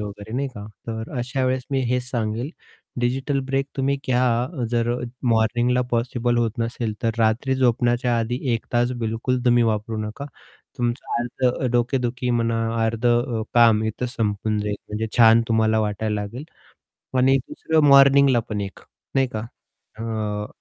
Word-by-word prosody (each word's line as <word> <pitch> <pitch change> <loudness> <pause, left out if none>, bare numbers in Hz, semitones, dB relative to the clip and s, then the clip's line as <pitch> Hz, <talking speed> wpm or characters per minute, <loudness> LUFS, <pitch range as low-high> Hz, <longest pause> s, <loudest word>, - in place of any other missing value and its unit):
वगैरे 105 +1 -7
नाही 140 +1 -1
का, 105 -5 -9 0.2
तर 110 -1 -5
अशा 130 +2 -1
वेळेस 130 0 0
मी 135 -1 +1
हेच 125 +1 0
सांगेल, 115 +2 -2 0.5
डिजिटल 135 +3 0
ब्रेक 135 +1 0
तुम्ही 135 +1 +1
घ्या, 125 +2 +1
जर 120 -1 +1 0.4
मॉर्निंगला 120 +3 +2
पॉसिबल 120 0 0
होत 115 -1 +1
नसेल 115 -1 -2
तर 115 - +2
रात्री 115 +4 +2
झोपण्याच्या 120 -1 +2
आधी 115 +2 -1 0.2
1 115 - -4
तास 120 0 +2
बिलकुल 120 +3 -1
तुम्ही 120 -1 +4
वापरू 110 0 -1
नका. 125 +7 -7 0.5
तुमचं 120 +1 -2
अर्धं 125 +1 -1
डोकेदुखी 125 0 0
म्हणा, 115 -1 +1 0.3
अर्धं 120 +1 +1
अ, - - -2
काम 115 -2 +5
इथं 110 +3 -2
संपून 105 -2 -1
जाईल, 105 0 -2
म्हणजे 105 +1 -2
छान 115 -1 +7
तुम्हाला 110 -1 +2
वाटायला 105 0 -1
लागेल 115 +7 -6 0.7
आणि 135 +1 +4
दुसरं 155 +3 0
मॉर्निंगला 140 -2 +6
पण 105 -2 -2
एक 100 -1 -6 0.4
नाही 135 -1 +3
का. - - -1 0.6
अ, 110 -2 -3
120 Hz, 150 wpm, -23 LUFS, 110-125 Hz, 0.7 s, छान